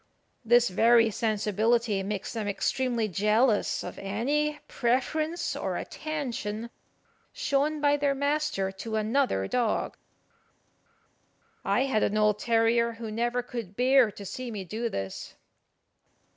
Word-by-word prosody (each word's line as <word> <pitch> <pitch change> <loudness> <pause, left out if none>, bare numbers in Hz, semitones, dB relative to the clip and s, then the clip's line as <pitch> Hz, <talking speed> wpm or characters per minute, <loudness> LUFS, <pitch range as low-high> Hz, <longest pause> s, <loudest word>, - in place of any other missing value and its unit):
This 240 +1 +4
very 230 +4 +4
sensibility 215 0 +1
makes 200 0 -4
them 220 -3 -3
extremely 235 +3 0
jealous 210 +4 +2
of - - -7
any 285 +10 -1
preference 305 +7 -1
or - - -2
attention 235 -7 -4 0.6
shown 300 - 0
by 290 0 +3
their 280 -1 +1
master 285 -8 0
to 220 +3 -6
another 220 - +1
dog. 235 - 0 1.7
I - - +1
had 265 -5 +1
an 210 - +1
old 210 -1 +3
terrier 235 0 +2
who 225 -1 -7
never 240 +2 -1
could 230 -6 -7
bear 255 0 +4
to 200 - -9
see 245 +6 -5
me 210 -4 -5
do 220 +6 -3
this. 95 - -6
235 Hz, 120 wpm, -28 LUFS, 210-265 Hz, 1.7 s, This